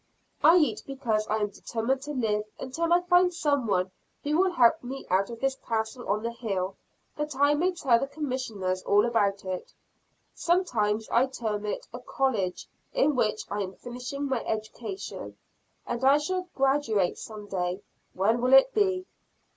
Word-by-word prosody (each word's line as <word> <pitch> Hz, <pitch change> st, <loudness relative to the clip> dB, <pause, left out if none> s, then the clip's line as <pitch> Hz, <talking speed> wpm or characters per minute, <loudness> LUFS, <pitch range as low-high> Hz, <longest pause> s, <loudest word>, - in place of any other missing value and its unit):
I 320 Hz, +3 st, +8 dB
eat 310 Hz, -4 st, +2 dB
because 235 Hz, -6 st, -1 dB
I 215 Hz, -, +1 dB
am 210 Hz, -1 st, 0 dB
determined 235 Hz, +6 st, -2 dB
to 290 Hz, +2 st, -6 dB
live 215 Hz, -5 st, 0 dB
until 330 Hz, +6 st, -2 dB
I 350 Hz, +1 st, +5 dB
find 360 Hz, 0 st, +4 dB
some 290 Hz, -7 st, 0 dB
one 185 Hz, -2 st, +1 dB, 0.3 s
who 295 Hz, +1 st, 0 dB
will 375 Hz, +3 st, +4 dB
help 255 Hz, +1 st, +5 dB
me 265 Hz, +2 st, -6 dB
out 190 Hz, +1 st, +2 dB
of 230 Hz, -1 st, -7 dB
this 270 Hz, 0 st, +2 dB
castle 225 Hz, 0 st, -3 dB
on 210 Hz, +2 st, +1 dB
the 235 Hz, -, -1 dB
hill, 195 Hz, -5 st, -3 dB, 0.4 s
that 300 Hz, -1 st, -3 dB
I 285 Hz, +2 st, +4 dB
may 355 Hz, +5 st, +1 dB
tell 265 Hz, -9 st, +3 dB
the 275 Hz, -, -2 dB
Commissioners 250 Hz, -10 st, -3 dB
all 205 Hz, +3 st, +4 dB
about 200 Hz, -4 st, +1 dB
it. 185 Hz, -1 st, -5 dB, 0.6 s
Sometimes 225 Hz, -, +1 dB
I 250 Hz, +3 st, +3 dB
term 215 Hz, -5 st, -3 dB
it -, -, -4 dB
a 245 Hz, -, -6 dB
college, 230 Hz, -8 st, -1 dB, 0.3 s
in -, -, +3 dB
which 215 Hz, -3 st, +1 dB
I 205 Hz, -, -1 dB
am 190 Hz, -1 st, -5 dB
finishing 250 Hz, +3 st, -5 dB
my 265 Hz, -4 st, -1 dB
education, 225 Hz, -, -5 dB, 0.5 s
and 240 Hz, +1 st, -3 dB
I 275 Hz, +2 st, +6 dB
shall 365 Hz, +4 st, -2 dB
graduate 270 Hz, -9 st, +1 dB
some 215 Hz, -2 st, -8 dB
day 185 Hz, -1 st, -3 dB, 0.3 s
when 220 Hz, +6 st, +2 dB
will 255 Hz, +1 st, +2 dB
it 270 Hz, -, +7 dB
be? 380 Hz, -3 st, +1 dB
245 Hz, 170 wpm, -27 LUFS, 210-290 Hz, 0.6 s, I